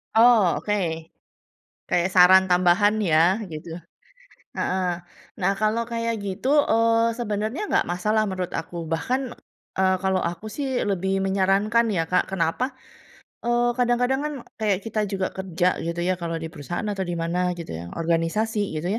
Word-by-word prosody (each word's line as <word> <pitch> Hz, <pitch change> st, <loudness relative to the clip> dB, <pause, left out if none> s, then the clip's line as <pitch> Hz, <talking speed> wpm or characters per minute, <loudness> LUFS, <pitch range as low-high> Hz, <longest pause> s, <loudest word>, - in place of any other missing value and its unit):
Oh, 225 Hz, -6 st, +6 dB
oke. 210 Hz, -, -1 dB, 1.2 s
Kayak 175 Hz, +1 st, +2 dB
saran 185 Hz, +1 st, +7 dB
tambahan 180 Hz, +4 st, +4 dB
ya, 175 Hz, +2 st, +3 dB
gitu. 160 Hz, +1 st, -7 dB, 0.8 s
Heeh. 180 Hz, -2 st, -1 dB, 0.4 s
Nah 190 Hz, +1 st, +2 dB
kalau 215 Hz, +2 st, +1 dB
kayak 230 Hz, -1 st, -2 dB
gitu, 200 Hz, +5 st, -4 dB, 0.2 s
eee, 230 Hz, 0 st, +3 dB
sebenarnya 215 Hz, -, -2 dB
nggak -, -, +2 dB
masalah, 210 Hz, +5 st, +1 dB
menurut 185 Hz, -2 st, -4 dB
aku. 170 Hz, +1 st, -5 dB
Bahkan, 245 Hz, +11 st, -2 dB, 0.5 s
eee, 190 Hz, 0 st, +3 dB
kalau 190 Hz, -1 st, +1 dB
aku 170 Hz, +4 st, -4 dB
sih, 265 Hz, +1 st, -2 dB
lebih 195 Hz, -1 st, 0 dB
menyarankan 195 Hz, +4 st, +2 dB
ya 165 Hz, -4 st, +1 dB
Kak, 180 Hz, -, +2 dB
kenapa, 195 Hz, +9 st, -1 dB, 0.7 s
eee, 240 Hz, 0 st, +2 dB
kadang-kadang 245 Hz, +2 st, +1 dB
kan, 300 Hz, 0 st, -3 dB, 0.3 s
kayak 205 Hz, -4 st, +1 dB
kita 220 Hz, -1 st, -1 dB
juga 190 Hz, -2 st, -1 dB
kerja, 185 Hz, -1 st, 0 dB
gitu 170 Hz, +1 st, -3 dB
ya, 185 Hz, +1 st, +1 dB
kalau 170 Hz, -1 st, -3 dB
di 160 Hz, -, -5 dB
perusahaan 165 Hz, +6 st, -5 dB
atau 200 Hz, -2 st, -2 dB
di 175 Hz, -1 st, -4 dB
mana, 180 Hz, +2 st, 0 dB
gitu 170 Hz, -, -7 dB
ya, 85 Hz, +2 st, -7 dB
organisasi 170 Hz, +7 st, 0 dB, 0.2 s
gitu 170 Hz, -, -4 dB
190 Hz, 150 wpm, -24 LUFS, 175-225 Hz, 1.2 s, saran